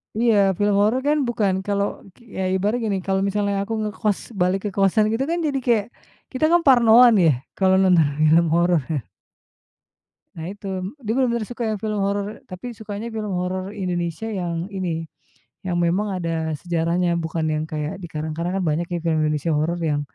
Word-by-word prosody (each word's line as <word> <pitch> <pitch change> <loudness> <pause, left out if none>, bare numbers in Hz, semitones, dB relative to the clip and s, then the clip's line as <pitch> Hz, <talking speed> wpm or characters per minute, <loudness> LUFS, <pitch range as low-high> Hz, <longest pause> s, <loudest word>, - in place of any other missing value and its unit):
Iya 230 0 +3 0.2
film 205 0 +2
horor 220 +6 +2
kan 300 +1 +3
bukan 210 -5 +1
kalau 200 0 +1 0.3
k - - -30 0.2
ya 190 - -1
ibaratnya 210 +5 0
gini 200 -2 0
kalau 190 0 +1
misalnya 200 0 0
aku 220 +3 -4
ngekos 210 -1 -1 0.2
balik 185 +2 +2
ke - - 0
kosan 200 +2 +3
gitu 235 +4 0
kan 340 +1 0
jadi 275 -2 -1
kayak, 225 -4 +3 0.5
kita 260 +3 0
kan 345 0 +5
parnoan 240 -1 +7
ya 160 - +6 0.3
kalau 190 -1 +4
nonton 180 -5 +4 0.2
film 165 +2 +5
horor. 175 0 +3 1.6
Nah 160 - -6
itu, 205 0 -9 0.3
dia 220 -4 -2
benar-benar 235 -4 +1
suka 245 0 -5
yang 215 -2 -2
film 215 0 -2
horor 200 +2 -3
tapi 215 +6 -7
sukanya 210 +1 -6
film 215 -2 -3
horor 185 +2 -3
Indonesia 180 -1 -3
yang 175 -5 -3
ini, 170 -4 -3 0.5
yang 180 -3 -2
memang 185 +3 0
ada 165 -2 -2
sejarahnya 170 +1 0
bukan 160 0 -2
yang 155 0 0
kayak 155 +4 -4
dikarang-karang 165 +2 -3
kan 190 - -1
banyak 165 +2 0
ya 175 - -2
film 160 -2 +1
Indonesia 155 +1 0
horor 155 +3 0
yang 155 -4 0
190 Hz, 175 wpm, -22 LUFS, 170-215 Hz, 1.6 s, parnoan